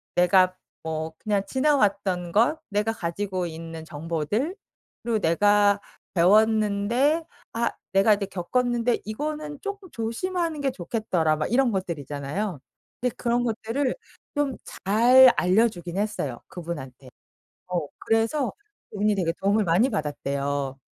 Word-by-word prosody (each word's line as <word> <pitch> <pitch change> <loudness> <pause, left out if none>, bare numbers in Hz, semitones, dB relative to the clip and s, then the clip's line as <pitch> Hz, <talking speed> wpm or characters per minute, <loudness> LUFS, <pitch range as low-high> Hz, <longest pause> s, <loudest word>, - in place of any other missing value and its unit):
내가 185 +1 +4 0.3
뭐 160 0 -3
그냥 205 -2 0
지나왔던 205 - +1
것, 245 +9 +3
내가 210 +2 0
가지고 185 -1 -3
있는 165 -1 -7
정보들, 165 - -2 0.5
그리고 230 -2 0
'내가 205 +4 +4 0.3
배웠는데 215 - +3 0.3
아 235 +1 0 0.2
내가 195 +3 +5
이제 200 -1 -3
겪었는데 240 +6 0
이거는 295 +6 -4
쪼끔 400 -2 -6
조심하는 320 +8 -2
게 275 -2 0
좋겠더라.' 175 -6 0
막 155 - -2
이런 250 -1 +3
것들 185 -5 -2
있잖아요. 145 +6 -4 0.4
근데 250 -1 -1
그런 240 0 0
것들을 235 - -1 0.4
좀 290 -2 0 0.3
잘 245 +5 +7
알려주긴 185 -2 +1
했어요. 200 - -2
그분한테. 145 -7 -7 0.6
어 175 -5 -2
그래서 225 +5 +1 0.4
그분이 210 +1 +1
되게 170 -4 0
도움을 200 +2 +3
많이 180 +10 +3
받았대요. 140 - -2
205 Hz, 285 characters per minute, -25 LUFS, 170-240 Hz, 0.6 s, 잘